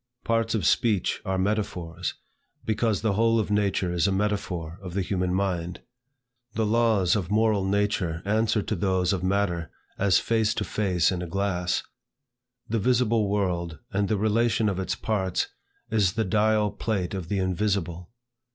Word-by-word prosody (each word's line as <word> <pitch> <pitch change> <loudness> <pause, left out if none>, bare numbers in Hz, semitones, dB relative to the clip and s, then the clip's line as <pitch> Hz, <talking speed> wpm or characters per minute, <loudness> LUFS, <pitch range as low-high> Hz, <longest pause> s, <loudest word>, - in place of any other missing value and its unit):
Parts 115 0 +1
of 100 -7 -1
speech 105 -1 +2
are 95 0 0
metaphors, 95 -4 -2 0.5
because 110 -2 0
the 110 -3 +2
whole 115 +2 +3
of 105 - -2
nature 100 -3 +1
is 90 +2 +2
a - - +1
metaphor 95 -4 -2
of 90 -2 -8
the 100 - +1
human 90 -1 -1
mind. 90 -2 -1 0.7
The 110 - 0
laws 110 -4 +3
of 95 -5 -2
moral 105 -1 +2
nature 95 -4 0
answer 110 0 +1
to 110 - -2
those 95 0 +1
of 95 - -2
matter 95 -3 0 0.3
as 95 -3 +4
face 110 -1 +1
to 110 - -1
face 95 -6 +1
in 90 -1 -2
a 90 - -4
glass. 90 -1 -1 0.8
"The 115 +1 0
visible 115 -2 +2
world 90 -5 -1 0.2
and 100 0 +1
the 110 - +1
relation 110 +1 +2
of 95 -2 -2
its 95 - -2
parts, 95 -5 -1 0.4
is 100 -5 +2
the 110 0 0
dial 105 +1 +2
plate 100 -5 -2
of 90 -4 -5
the 100 - 0
invisible." 95 -2 -1
100 Hz, 160 wpm, -26 LUFS, 90-110 Hz, 0.8 s, as